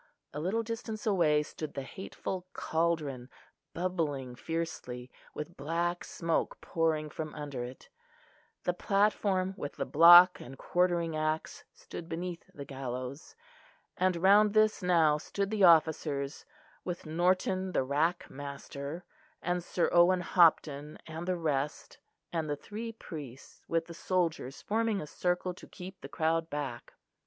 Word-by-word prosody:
A 150 - -4
little 195 +8 0
distance 225 -1 -5
away 160 -8 +3
stood 155 0 -7
the 140 - -3
hateful 185 +4 -6
cauldron, 155 -6 -1 0.5
bubbling 155 -8 -2
fiercely, 130 -4 -4 0.2
with 170 +3 -6
black 170 +4 -1
smoke 165 -1 -1
pouring 160 -2 0
from 155 0 -5
under 145 -5 -4
it: 125 +1 -9 0.8
the 180 - +1
platform 195 -1 +1
with 145 - -5
the - - -2
block 175 +3 +9
and 135 +2 -10
quartering 175 -2 +1
axe 155 0 -2
stood 170 - -9
beneath 175 +2 -5
the 145 -7 -8
gallows; 130 +1 -6 0.6
and 185 0 +2
round 200 +4 +5
this 215 0 +4
now 165 -4 +4
stood 200 +5 -3
the 210 -2 +1
officers, 155 - +3 0.4
with 175 -1 -5
Norton 185 +3 +1
the 135 - +1
rack 155 +6 0
master, 140 +3 -7 0.4
and 175 0 -1
Sir 175 0 0
Owen 180 +1 +5
Hopton 155 -4 +3
and 160 +2 -6
the 185 -1 +1
rest, 150 -3 -2 0.3
and 160 -2 -1
the 145 - 0
three 215 +9 -6
priests, 145 - -10
with 165 0 0
the 170 - -9
soldiers 170 -6 -1
forming 220 -1 +1
a - - -5
circle 180 +3 -1
to - - -13
keep 185 +1 -10
the - - -8
crowd 165 0 0
back. 140 -5 -5
165 Hz, 140 wpm, -31 LUFS, 150-185 Hz, 0.8 s, block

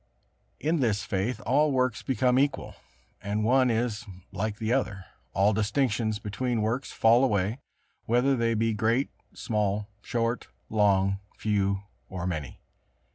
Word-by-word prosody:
In 160 +2 +1
this 110 -5 +1
faith 110 +3 -2
all 145 +5 +3
works 130 -3 +1
become 130 -1 +2
equal, 140 -1 0 0.5
and 105 +2 -1
one 130 +3 +4
is 115 -1 -1 0.3
like 105 +2 -3
the 110 +2 0
other; 105 -8 -1 0.3
all 100 +2 +3
distinctions 110 0 0
between 110 +2 -2
works 115 +5 -1
fall 115 +3 +4
away, 105 -1 +1 0.5
whether 125 +4 +3
they 115 -2 +1
be 115 +1 +1
great, 115 +6 +1 0.2
small, 105 -2 -1
short, 115 +1 -1 0.2
long, 100 -2 +3 0.2
few 100 -2 0 0.3
or 90 -2 -4
many. 80 -7 -4
110 Hz, 130 wpm, -27 LUFS, 105-125 Hz, 0.5 s, one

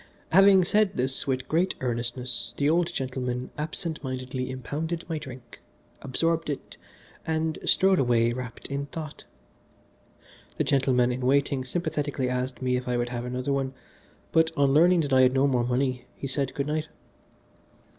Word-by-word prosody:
Having 195 0 +7
said 210 +1 +2
this 130 +2 -1
with 130 -1 -1
great 175 +4 +1
earnestness 120 0 -2
the 140 - +2
old 170 +2 +2
gentleman 125 -1 -3
absent 155 +1 -4
mindedly 130 -1 -4
impounded 150 +6 -4
my 160 -3 -2
drink, 130 -4 -11 0.4
absorbed 165 +4 0
it, 145 - -5 0.5
and 160 0 -1
strode 190 -1 +4
away 120 -2 +3
wrapped 125 -2 -7
in 140 0 -3
thought. 155 0 -7 1.3
The - - +2
gentleman 130 -3 +2
in 125 +1 -3
waiting 135 +1 +2
sympathetically 145 -3 -2
asked 125 +1 -3
me 125 0 +2
if 125 - -5
I 125 -1 0
would 120 0 -1
have 120 0 -4
another 125 +2 -2
one, 135 -1 -2 0.6
but 160 0 +4
on 140 -1 +3
learning 170 +3 +5
that 145 -3 -1
I 130 - +6
had 130 0 +5
no 135 +1 +4
more 125 -4 +2
money 125 0 0
he - - -7
said 135 0 -2
good 140 - -1
night. 155 +1 -2
135 Hz, 160 wpm, -27 LUFS, 125-155 Hz, 1.3 s, Having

